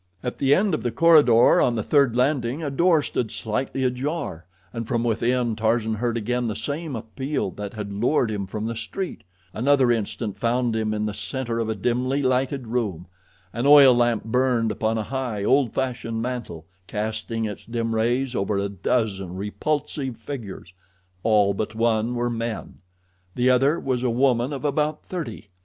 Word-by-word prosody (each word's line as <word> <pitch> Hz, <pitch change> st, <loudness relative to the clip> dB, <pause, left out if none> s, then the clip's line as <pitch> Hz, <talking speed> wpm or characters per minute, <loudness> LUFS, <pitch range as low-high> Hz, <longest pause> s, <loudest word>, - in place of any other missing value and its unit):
At 125 Hz, -, -4 dB
the 140 Hz, +1 st, +4 dB
end 195 Hz, -1 st, +1 dB
of -, -, 0 dB
the 120 Hz, -, -1 dB
corridor 145 Hz, -3 st, +5 dB
on 120 Hz, -, +2 dB
the 110 Hz, -, -1 dB
third 140 Hz, -6 st, +3 dB
landing 130 Hz, +2 st, 0 dB
a 145 Hz, -, -2 dB
door 165 Hz, +1 st, +3 dB
stood 120 Hz, -5 st, -2 dB
slightly 130 Hz, +6 st, -3 dB
ajar, 125 Hz, -, -3 dB, 0.3 s
and 115 Hz, -1 st, -4 dB
from 120 Hz, -1 st, 0 dB
within 120 Hz, 0 st, +1 dB
Tarzan 110 Hz, 0 st, +1 dB
heard 120 Hz, +2 st, -1 dB
again 120 Hz, +2 st, -1 dB
the 110 Hz, -, -3 dB
same 150 Hz, 0 st, -4 dB
appeal 115 Hz, +1 st, -3 dB
that 105 Hz, +1 st, -7 dB
had 105 Hz, -2 st, -5 dB
lured 115 Hz, +2 st, +1 dB
him 100 Hz, -2 st, -3 dB
from 105 Hz, +2 st, -4 dB
the 115 Hz, +1 st, -3 dB
street. 180 Hz, -, -5 dB, 0.3 s
Another 130 Hz, +1 st, +3 dB
instant 110 Hz, -2 st, -2 dB
found 120 Hz, 0 st, 0 dB
him 110 Hz, -1 st, 0 dB
in 105 Hz, 0 st, -1 dB
the 105 Hz, -, -2 dB
center 115 Hz, +4 st, -3 dB
of 115 Hz, -1 st, -1 dB
a 110 Hz, -, -1 dB
dimly 125 Hz, +6 st, 0 dB
lighted 130 Hz, +1 st, 0 dB
room. 110 Hz, -8 st, -2 dB, 0.5 s
An 120 Hz, +3 st, -1 dB
oil 140 Hz, -3 st, +9 dB
lamp 120 Hz, -2 st, +2 dB
burned 120 Hz, -1 st, +1 dB
upon 110 Hz, +2 st, -1 dB
a 110 Hz, -, -1 dB
high, 125 Hz, -4 st, -3 dB
old 130 Hz, +1 st, +3 dB
fashioned 120 Hz, -3 st, -2 dB
mantel, 115 Hz, -9 st, -5 dB, 0.2 s
casting 110 Hz, +1 st, -3 dB
its 105 Hz, -2 st, -6 dB
dim 115 Hz, -1 st, -2 dB
rays 120 Hz, +3 st, 0 dB
over 100 Hz, +1 st, 0 dB
a 100 Hz, 0 st, -1 dB
dozen 95 Hz, -2 st, -1 dB
repulsive 135 Hz, +5 st, -3 dB
figures. 110 Hz, -7 st, -8 dB, 0.5 s
All 105 Hz, -2 st, +3 dB
but 110 Hz, +2 st, -4 dB
one 115 Hz, +1 st, +1 dB
were 120 Hz, 0 st, -1 dB
men. 115 Hz, -2 st, -5 dB, 0.6 s
The 125 Hz, +1 st, +3 dB
other 135 Hz, +6 st, +3 dB
was 130 Hz, -2 st, -1 dB
a 125 Hz, -, +1 dB
woman 125 Hz, +1 st, +2 dB
of 140 Hz, +1 st, -5 dB
about 150 Hz, +1 st, 0 dB
thirty. 115 Hz, -, -6 dB
120 Hz, 175 wpm, -24 LUFS, 110-130 Hz, 0.6 s, oil